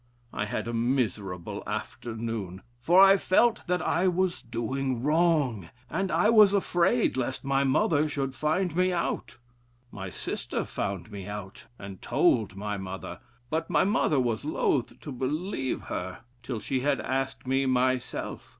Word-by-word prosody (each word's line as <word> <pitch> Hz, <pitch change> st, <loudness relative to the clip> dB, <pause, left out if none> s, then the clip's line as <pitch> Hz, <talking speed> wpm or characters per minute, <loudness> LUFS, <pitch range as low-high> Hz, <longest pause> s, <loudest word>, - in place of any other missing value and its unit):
I 100 Hz, -, -1 dB
had 105 Hz, -, -3 dB
a 120 Hz, -, -3 dB
miserable 110 Hz, -7 st, -1 dB
afternoon; 110 Hz, -5 st, -5 dB, 0.2 s
for 175 Hz, +10 st, +6 dB
I 195 Hz, 0 st, +7 dB
felt 225 Hz, +5 st, +3 dB
that 180 Hz, 0 st, 0 dB
I 180 Hz, +3 st, +2 dB
was 185 Hz, 0 st, 0 dB
doing 125 Hz, +2 st, -2 dB
wrong, 150 Hz, -, +2 dB, 0.2 s
and 190 Hz, +2 st, -1 dB
I 210 Hz, -, +3 dB
was 210 Hz, -3 st, +7 dB
afraid 190 Hz, +4 st, +2 dB
lest 130 Hz, 0 st, -2 dB
my 135 Hz, 0 st, +2 dB
mother 145 Hz, +3 st, +2 dB
should 135 Hz, -2 st, -2 dB
find 160 Hz, +4 st, 0 dB
me 185 Hz, +1 st, +3 dB
out. 170 Hz, -1 st, -2 dB, 0.5 s
My 95 Hz, -1 st, -6 dB
sister -, -, -4 dB
found 100 Hz, +2 st, -4 dB
me 100 Hz, -2 st, -7 dB
out 105 Hz, -1 st, -7 dB
and 100 Hz, -2 st, -9 dB
told 120 Hz, -, +2 dB
my 105 Hz, +1 st, -3 dB
mother, 95 Hz, 0 st, -6 dB, 0.3 s
but 160 Hz, +1 st, -1 dB
my 155 Hz, -4 st, +3 dB
mother 185 Hz, -7 st, +2 dB
was 120 Hz, -2 st, 0 dB
loth 145 Hz, -4 st, 0 dB
to 150 Hz, -, -7 dB
believe 135 Hz, +2 st, -2 dB
her 90 Hz, +3 st, -5 dB, 0.2 s
till 120 Hz, -2 st, -4 dB
she 130 Hz, +4 st, -1 dB
had 140 Hz, +1 st, +1 dB
asked 135 Hz, +1 st, -2 dB
me 135 Hz, +1 st, +1 dB
myself. 130 Hz, 0 st, -1 dB
130 Hz, 150 wpm, -28 LUFS, 110-165 Hz, 0.5 s, I